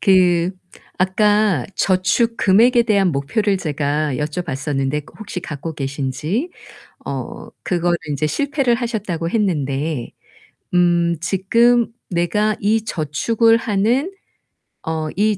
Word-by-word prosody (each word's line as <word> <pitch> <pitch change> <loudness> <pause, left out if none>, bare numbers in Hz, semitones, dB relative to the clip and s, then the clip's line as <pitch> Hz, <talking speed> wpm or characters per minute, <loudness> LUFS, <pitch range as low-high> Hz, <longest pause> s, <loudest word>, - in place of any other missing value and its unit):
그 180 -2 +4 0.5
아까 205 - +2
저축 195 +5 +1
금액에 235 +5 +4
대한 200 -4 +3
목표를 195 +9 0
제가 150 -3 -1
여쭤봤었는데 150 -2 -2
그 - - -17
혹시 205 -4 -6
갖고 160 0 -6
계신지. 145 - -3 0.5
어 - - -6 0.2
그거를 175 -1 +1
인제 145 +1 -1
실패를 270 - +1
하셨다고 205 -9 -3
했는데 150 - -1 0.6
음 175 -1 +3
지금 230 +7 +3 0.2
내가 195 +5 0
이 215 +2 +1
저축을 225 +8 +2
하는 230 - 0 0.8
어 160 -1 -2
이 210 0 +2
180 Hz, 225 characters per minute, -19 LUFS, 155-215 Hz, 0.8 s, 그